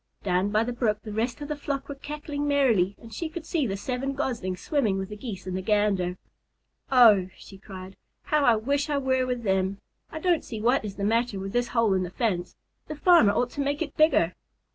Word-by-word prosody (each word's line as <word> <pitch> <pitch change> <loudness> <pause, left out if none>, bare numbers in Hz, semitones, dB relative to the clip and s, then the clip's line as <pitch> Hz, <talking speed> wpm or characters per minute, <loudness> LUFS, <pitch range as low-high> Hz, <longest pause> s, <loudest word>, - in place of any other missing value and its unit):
Down 185 +1 +1
by 215 +2 +2
the 245 +1 -3
brook 215 -3 -1
the 215 - -7
rest 235 +5 -2
of 290 - -5
the 300 - -3
flock 280 -1 -4
were 285 - -5
cackling 290 +1 -5
merrily, 230 -10 +2
and 225 -1 -13
she 330 - -4
could 320 0 -7
see 310 -5 0
the 195 -1 -3
seven 255 +5 -3
Goslings 230 -10 -3
swimming 225 -10 0
with 190 0 -4
the 210 - -6
Geese 205 -4 -7
and 185 -1 -4
the 190 - -2
Gander. 195 -3 +1 0.7
"Oh," 215 -8 +6
she 195 - -13
cried, 190 -2 -10 0.3
"how 300 -1 +1
I 240 -4 +5
wish 280 +7 -1
I 290 - +1
were 260 -2 +1
with 250 -1 -2
them! 190 -1 0 0.3
I 315 - -6
don't 345 -1 +1
see 225 - -6
what 245 +4 +2
is 205 -2 -6
the 200 - -5
matter 225 0 +1
with 195 0 -6
this 245 0 +1
hole 230 -4 +2
in 190 - +1
the 180 - -3
fence. 180 -4 -2 0.3
The 305 - -5
farmer 295 - +5
ought 245 +2 0
to 285 - -3
make 285 +3 0
it 290 - -9
bigger." 305 - +3
230 Hz, 230 wpm, -26 LUFS, 195-280 Hz, 0.7 s, Oh